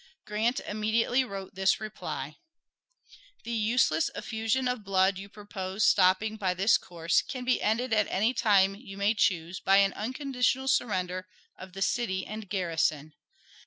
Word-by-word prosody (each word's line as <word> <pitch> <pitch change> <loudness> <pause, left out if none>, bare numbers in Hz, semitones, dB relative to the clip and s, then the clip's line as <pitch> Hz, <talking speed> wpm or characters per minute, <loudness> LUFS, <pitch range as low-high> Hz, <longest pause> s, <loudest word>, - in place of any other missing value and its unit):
Grant 220 +4 0
immediately 220 +4 0
wrote 195 -5 -7
this 190 0 +2
reply: 155 -9 -6 1.1
The 235 - -6
useless 220 -7 +2
effusion 225 +3 -1
of 250 -3 -2
blood 190 -1 +2
you 200 +1 -9
propose 200 -1 -5
stopping 195 +3 +3
by 185 -3 -1
this 195 +5 +4
course 170 -1 0
can 255 -1 -7
be 255 - +1
ended 230 +3 0
at 210 -2 +3
any 220 +6 +1
time 200 -5 +3
you 195 -2 -11
may 200 +2 +2
choose 185 -4 0
by 195 0 +4
an 195 0 +4
unconditional 260 +2 -1
surrender 185 -8 0 0.3
of 185 -1 -12
the 195 +1 -2
city 190 -6 -1
and 215 -2 -8
garrison. 160 -5 -1
205 Hz, 150 wpm, -28 LUFS, 185-225 Hz, 1.1 s, this